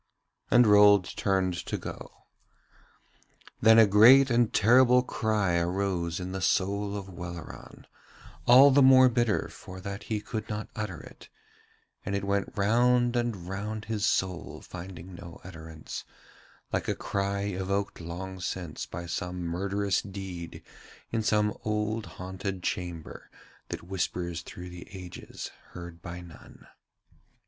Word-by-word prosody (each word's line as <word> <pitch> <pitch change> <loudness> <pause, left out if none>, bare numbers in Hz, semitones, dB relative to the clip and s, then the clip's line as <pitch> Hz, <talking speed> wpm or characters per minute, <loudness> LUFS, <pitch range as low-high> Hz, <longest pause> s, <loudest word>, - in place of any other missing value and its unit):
And 120 0 +6
Rold 105 -2 +7
turned 95 -2 +1
to - - -2
go. - - -9 1.4
Then 110 0 +7
a 115 - +9
great 120 +7 +7
and 120 -1 +3
terrible 125 +3 +5
cry 105 -8 0
arose 85 -1 -1
in 90 0 -5
the 95 0 -4
soul 100 +2 0
of 100 - -6
Welleran, 85 -2 -9 0.6
all 130 +4 +9
the 140 +1 +5
more 130 -1 +8
bitter 120 -3 +1
for 95 0 -11
that 100 +1 -6
he 110 -2 0
could 110 +1 -5
not 105 -1 -4
utter 100 -7 -4
it, - - -14 0.7
and 100 - -2
it 100 - -2
went 100 0 -1
round 120 +4 +3
and 115 -7 -2
round 105 +3 -4
his 110 -2 -3
soul 95 -5 -1
finding 90 0 -9
no 85 -1 -10
utterance, 80 -3 -8 0.7
like - - -1
a - - 0
cry 100 0 -2
evoked 100 0 -2
long 95 +3 -6
since 90 -2 -4
by 85 +1 -6
some 90 +1 -4
murderous 100 +3 -1
deed 95 -4 -8 0.5
in 115 - 0
some 105 -1 +1
old 105 +1 -1
haunted 95 0 -5
chamber 85 -3 -5 0.4
that - - -5
whispers 85 -2 -3
through 90 0 -9
the 90 -1 -10
ages 90 -1 -8 0.2
heard 85 -1 -9
by 85 +1 -7
none. 85 -3 -14
100 Hz, 135 wpm, -28 LUFS, 90-110 Hz, 1.4 s, a